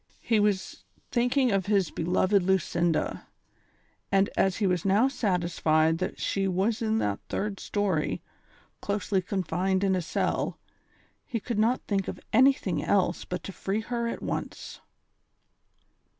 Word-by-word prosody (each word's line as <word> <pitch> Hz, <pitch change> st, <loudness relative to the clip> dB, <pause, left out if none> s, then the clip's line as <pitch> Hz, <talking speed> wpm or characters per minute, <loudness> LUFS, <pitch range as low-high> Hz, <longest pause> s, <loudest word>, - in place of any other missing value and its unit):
He 225 Hz, -2 st, +2 dB
was 205 Hz, -2 st, 0 dB, 0.3 s
thinking 250 Hz, +1 st, +2 dB
of 195 Hz, -1 st, 0 dB
his 200 Hz, -5 st, +2 dB
beloved 185 Hz, +4 st, +2 dB
Lucinda, 175 Hz, -3 st, 0 dB, 0.8 s
and 195 Hz, 0 st, +3 dB
as 190 Hz, -2 st, +2 dB
he 215 Hz, -, 0 dB
was 180 Hz, -3 st, +1 dB
now 200 Hz, +6 st, +4 dB
satisfied 170 Hz, -, +1 dB
that 185 Hz, -, -3 dB
she 195 Hz, -1 st, 0 dB
was 195 Hz, +5 st, 0 dB
in 220 Hz, -1 st, +1 dB
that 100 Hz, -, -1 dB
third 205 Hz, -1 st, -2 dB
story, 195 Hz, -7 st, -1 dB, 0.6 s
closely 200 Hz, -1 st, 0 dB
confined 190 Hz, 0 st, -1 dB
in 190 Hz, -1 st, +3 dB
a 185 Hz, -, 0 dB
cell, 160 Hz, -, -1 dB, 0.7 s
he 235 Hz, -, -3 dB
could 225 Hz, 0 st, -3 dB
not 235 Hz, +4 st, +2 dB
think 195 Hz, -2 st, -1 dB
of -, -, -5 dB
anything 250 Hz, -7 st, +3 dB
else 185 Hz, -3 st, +1 dB
but 180 Hz, -2 st, -5 dB
to -, -, -6 dB
free 200 Hz, +4 st, -2 dB
her 235 Hz, +1 st, -2 dB
at 235 Hz, -, -4 dB
once. -, -, -5 dB
195 Hz, 140 wpm, -27 LUFS, 180-215 Hz, 0.8 s, now